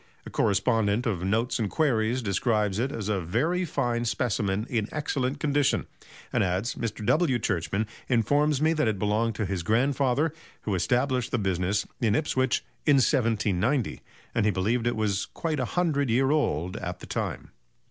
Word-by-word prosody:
A - - -8
correspondent 110 +1 +1
of 95 -7 -1
"Notes 115 +7 0
and 105 -3 0
Queries" 125 -4 +1
describes 105 0 +1
it 130 +3 0
as 110 -7 -4
a 100 -3 0
very 155 - 0
fine 120 -6 -1
specimen 110 -4 0
in 110 -4 -1
excellent 140 -2 -2
condition, 145 -1 +1 0.5
and - - +3
adds: 95 +5 -1
"Mr. 110 -2 -4
W. 155 - +3
Churchman 100 0 -1 0.2
informs 145 +5 +2
me 160 +1 +4
that 155 -6 +1
it 110 -2 0
belonged 105 +3 0
to 110 - -1
his 95 -2 -2
grandfather, 135 - +1 0.3
who 105 - -1
established 125 +6 +1
the - - 0
business 95 0 0
in 110 -5 +2
Ipswich 130 -2 0 0.2
in 145 - +5
1790, 115 -1 +1 0.3
and 115 - +1
he - - +4
believed 110 +6 0
it 120 - +1
was 105 -3 0
quite 160 -3 -2
'a 130 - 0
hundred' 150 -4 0
year 135 +4 +3
old 90 - 0
at 90 0 -5
that - - -11
time." - - -3
115 Hz, 170 wpm, -27 LUFS, 100-135 Hz, 0.5 s, in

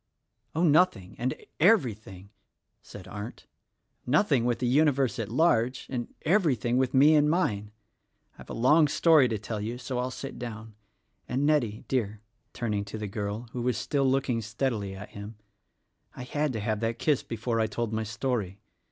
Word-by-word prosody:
"Oh, 165 - +1
nothing, 150 - +3
and 125 +1 -1 0.2
everything," 110 - +1 0.5
said 100 -3 -12
Arndt; 105 +3 -8 0.6
"nothing 140 - +2
with 120 -1 +1
the 125 - -2
universe 135 -1 +2
at 110 -3 -3
large, 130 -2 +2
and 120 -2 -3
everything 150 - +2
with 130 0 +1
me 145 +4 +7
and 150 -1 +4
mine. 105 - 0 0.7
I've - - -12
a - - -5
long 150 +6 +5
story 155 -2 +5
to 115 -2 -2
tell 105 +1 -5
you, 115 +3 -4
so 125 0 -4
I'll 125 +1 -1
sit 135 +1 -7
down. 115 -2 -7 0.6
And 135 +3 0
Nettie, 125 -9 +1
dear," 110 -5 -1 0.3
turning 105 -4 -2
to 100 +2 -7
the 105 - -4
girl 105 +3 -4
who 125 - -4
was 125 0 0
still 140 -2 +1
looking 130 -3 0
steadily 110 -3 -2
at 105 +2 -9
him, 105 +2 -8 0.8
"I - - -7
had 145 +3 -1
to 110 - -3
have 110 0 -1
that 115 +1 -1
kiss 145 +2 +1
before 115 0 -3
I 110 - +2
told 115 +1 -3
my 110 - 0
story. 110 -3 -2
120 Hz, 170 wpm, -28 LUFS, 110-135 Hz, 0.8 s, me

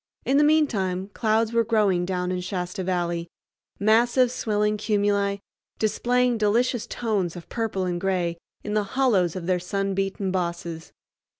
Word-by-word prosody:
In 270 - +3
the - - +5
mean 310 +1 +5
time 190 -6 -2
clouds 220 +2 +1
were 230 0 +3
growing 210 -5 +2
down 180 -1 -1
in 180 0 -2
Shasta 180 0 -4
Valley—massive 200 +7 0
swelling 210 -3 0
cumuli, 200 -1 0 0.4
displaying 245 +2 +1
delicious 235 +3 +1
tones 200 -7 -1
of 175 - -10
purple 220 -5 -2
and 175 -1 -2
gray 180 -3 -1 0.2
in 210 - -4
the 210 -1 +2
hollows 195 -11 +3
of 180 -2 -5
their 180 0 +1
sun 195 +2 -2
beaten 195 0 -1
bosses. 170 -2 -3
200 Hz, 145 wpm, -25 LUFS, 180-225 Hz, 0.4 s, the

